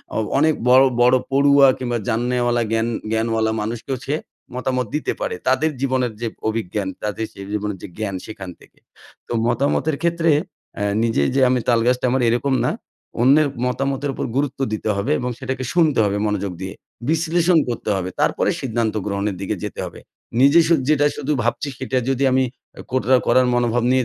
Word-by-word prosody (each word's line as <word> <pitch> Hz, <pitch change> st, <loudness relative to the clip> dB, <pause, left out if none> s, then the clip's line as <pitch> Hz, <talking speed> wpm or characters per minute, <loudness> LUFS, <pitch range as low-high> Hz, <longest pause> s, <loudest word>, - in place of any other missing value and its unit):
অ -, -, 0 dB, 0.2 s
অনেক 155 Hz, +2 st, +4 dB, 0.2 s
বড়ো, 130 Hz, +1 st, +7 dB
বড়ো 125 Hz, +1 st, +5 dB
পড়ুয়া 140 Hz, 0 st, +6 dB
কিংবা 120 Hz, -2 st, -2 dB
জাননেওয়ালা 120 Hz, +1 st, +1 dB
জ্ঞান 115 Hz, +1 st, +1 dB, 0.2 s
জ্ঞানওয়ালা 110 Hz, 0 st, +1 dB
মানুষকেও 115 Hz, +5 st, -3 dB
সে 145 Hz, -, 0 dB, 0.4 s
মতামত 125 Hz, 0 st, -1 dB
দিতে 150 Hz, -, -1 dB
পারে। -, -, -2 dB
তাদের 130 Hz, +5 st, +2 dB
জীবনের 130 Hz, -3 st, 0 dB
যে 120 Hz, -, -1 dB, 0.2 s
অভিজ্ঞান 105 Hz, -2 st, -3 dB, 0.2 s
তাদের 105 Hz, +1 st, -2 dB
সেই 100 Hz, 0 st, -9 dB
জীবনের 105 Hz, -1 st, -2 dB
যে -, -, -5 dB
জ্ঞান, 105 Hz, -3 st, -3 dB
সেখান 100 Hz, -4 st, -8 dB
থেকে। -, -, -21 dB, 0.5 s
তো -, -, -10 dB, 0.2 s
মতামতের 140 Hz, +4 st, +1 dB
ক্ষেত্রে, 170 Hz, -1 st, +2 dB, 0.4 s
"অ্যা 105 Hz, -, -2 dB, 0.2 s
নিজেই 115 Hz, -12 st, +1 dB
যে 135 Hz, -, +3 dB
আমি, 125 Hz, -1 st, +2 dB
তালগাছটা 120 Hz, +2 st, +2 dB
আমার" 130 Hz, -1 st, +1 dB
এরকম 120 Hz, +4 st, +1 dB
না। -, -, +1 dB, 0.5 s
অন্যের 145 Hz, +4 st, +5 dB, 0.2 s
মতামতের 135 Hz, +2 st, -1 dB
ওপর -, -, -3 dB
গুরুত্ব 140 Hz, -1 st, -1 dB
দিতে 110 Hz, -, -2 dB
হবে 125 Hz, +9 st, -1 dB
এবং 125 Hz, -, -2 dB
সেটাকে 130 Hz, 0 st, -3 dB
শুনতে 160 Hz, -8 st, +3 dB
হবে 100 Hz, 0 st, 0 dB
মনোযোগ 100 Hz, -2 st, -2 dB
দিয়ে। 95 Hz, 0 st, -5 dB, 0.4 s
বিশ্লেষণ 165 Hz, +1 st, +2 dB
করতে 115 Hz, -2 st, -3 dB
হবে 95 Hz, -1 st, -2 dB
তারপরে -, -, +2 dB
সিদ্ধান্ত 115 Hz, -3 st, -1 dB
গ্রহণের 100 Hz, -1 st, -2 dB
দিকে 100 Hz, -, -2 dB
যেতে -, -, -5 dB
হবে। -, -, -9 dB, 0.4 s
নিজে 140 Hz, +5 st, +6 dB
শু 170 Hz, -, +4 dB, 0.2 s
যেটা 145 Hz, -1 st, +4 dB
শুধু 150 Hz, +1 st, -2 dB
ভাবছি 120 Hz, +5 st, -1 dB
সেটা 130 Hz, 0 st, -2 dB
যদি 135 Hz, +1 st, 0 dB
আমি 130 Hz, 0 st, +3 dB, 0.4 s
আ -, -, -5 dB
কোট্রা 130 Hz, 0 st, +3 dB
করার 125 Hz, +1 st, +4 dB
মনোভাব 120 Hz, -1 st, +1 dB
নিয়ে 130 Hz, 0 st, +3 dB
125 Hz, 175 wpm, -21 LUFS, 110-140 Hz, 0.5 s, বড়ো